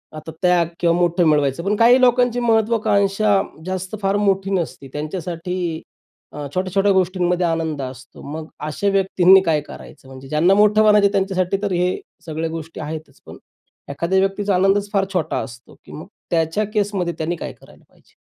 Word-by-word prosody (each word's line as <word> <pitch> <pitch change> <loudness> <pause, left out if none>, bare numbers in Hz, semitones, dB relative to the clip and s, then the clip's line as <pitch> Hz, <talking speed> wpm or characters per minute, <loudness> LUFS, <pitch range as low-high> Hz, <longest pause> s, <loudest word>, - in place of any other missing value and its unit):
आता 155 +1 -8
त्याग 180 -2 +3
किंवा 170 -1 +2
मोठं 175 0 +2
मिळवायचं 145 0 +1
पण 200 +3 0
काही 240 +4 +5
लोकांची 245 -1 +3
महत्त्वाकांक्षा 215 -3 +2 0.2
जास्त 185 +2 -4
फार 195 0 +1
मोठी 195 -1 +1
नसते. 170 -7 -3
त्यांच्यासाठी 170 +2 -4 0.5
अ, 150 -1 -5
छोट्या-छोट्या 190 +2 +1
गोष्टींमध्ये 180 -1 +1
आनंद 160 -3 -2
असतो 130 0 -9
मग 160 0 -6 0.2
अशा 155 +7 -2
व्यक्तींनी 190 -1 +5
काय 155 -3 +1
करायचं 145 -1 -13
म्हणजे 130 0 -12
ज्यांना 160 +6 +3
मोठं 210 +1 +4
म्हणायचं 210 -2 +5
त्यांच्यासाठी 190 -1 0
तर 205 - -2
हे 180 +1 0 0.3
सगळ्या 160 0 -3
गोष्टी 165 0 -7
आहेतच 155 -2 -8
पण - - -11 0.5
एखाद्या 170 +7 0
व्यक्तीचा 195 +1 0
आनंदच 195 +2 +2
फार 195 -1 +2
छोटा 165 -4 -1
असतो, 120 -1 -10
की - - -14
मग 155 - -9 0.3
त्याच्या 165 +4 +1
केसमध्ये 200 -5 -1
त्यांनी 165 +2 -2
काय - - -7
करायला - - -20
पाहिजे? - - -28
180 Hz, 160 wpm, -20 LUFS, 160-200 Hz, 0.5 s, काही